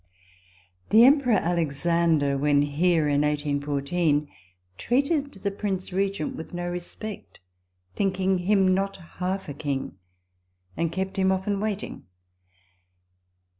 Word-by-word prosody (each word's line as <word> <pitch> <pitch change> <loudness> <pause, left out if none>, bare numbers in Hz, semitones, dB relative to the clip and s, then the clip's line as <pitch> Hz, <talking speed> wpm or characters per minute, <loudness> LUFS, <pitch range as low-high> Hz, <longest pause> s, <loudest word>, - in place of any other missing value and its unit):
The 220 +2 +7
Emperor 270 -3 +5
Alexander, 165 -3 +1
when 145 +1 +3
here 155 +2 +2
[in 145 0 +2
1814], 145 +1 0 0.5
treated 280 +3 +1
the 200 +1 -3
Prince 195 -2 -3
Regent 195 -3 -1
with 165 - -8
no 175 0 -3
respect, 180 +4 -7 0.6
thinking 190 -1 +1
him 190 0 +3
not 195 +1 -1 0.2
half 185 +2 -2
a 145 - -5
king, 135 -9 -4 0.8
and 165 -1 -1
kept 190 +2 -3
him 190 0 +3
often 195 +1 -1
waiting. 210 -1 -4
180 Hz, 110 wpm, -25 LUFS, 150-195 Hz, 0.8 s, The